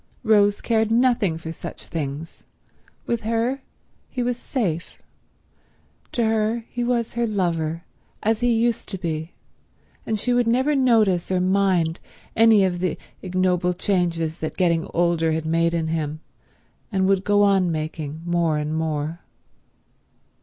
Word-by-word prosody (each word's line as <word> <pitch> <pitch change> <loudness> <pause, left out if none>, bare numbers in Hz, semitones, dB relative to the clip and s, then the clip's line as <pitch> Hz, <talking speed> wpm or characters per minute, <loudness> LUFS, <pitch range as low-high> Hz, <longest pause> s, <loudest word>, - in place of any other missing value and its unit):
Rose 205 -2 +4
cared 220 -2 +1
nothing 235 -7 +2
for 160 0 -6
such 165 +1 -8
things. 150 0 -5 0.6
With 235 -1 -1
her 230 +5 -1 0.5
he 250 - -2
was 245 0 0
safe. 200 - -3 1.1
To 235 - +1
her 220 +1 0
he 245 - -2
was 240 -1 0
her 235 0 0
lover, 170 -5 -1 0.4
as 220 0 +2
he 245 0 +2
used 230 0 +1
to 195 - -4
be; 160 -2 -4 0.7
and 220 -1 -2
she 245 +4 0
would 245 -1 +2
never 260 +6 +2
notice 220 -10 +3
or 185 - +2
mind 185 -3 +2 0.4
any 225 -3 +6
of 180 -2 0
the 180 -2 -1 0.2
ignoble 180 -1 +1
changes 170 -4 0
that 160 - -4
getting 170 -3 +1
older 170 -2 +1
had 160 0 -2
made 165 +1 +1
in 160 -1 -1
him 155 -1 -2 0.7
and 190 -2 +1
would 195 -1 +2
go 205 0 +3
on 195 -3 +3
making 155 0 -4
more 170 -3 +1
and 150 +1 -2
more. 160 0 -2
185 Hz, 145 wpm, -23 LUFS, 165-225 Hz, 1.1 s, any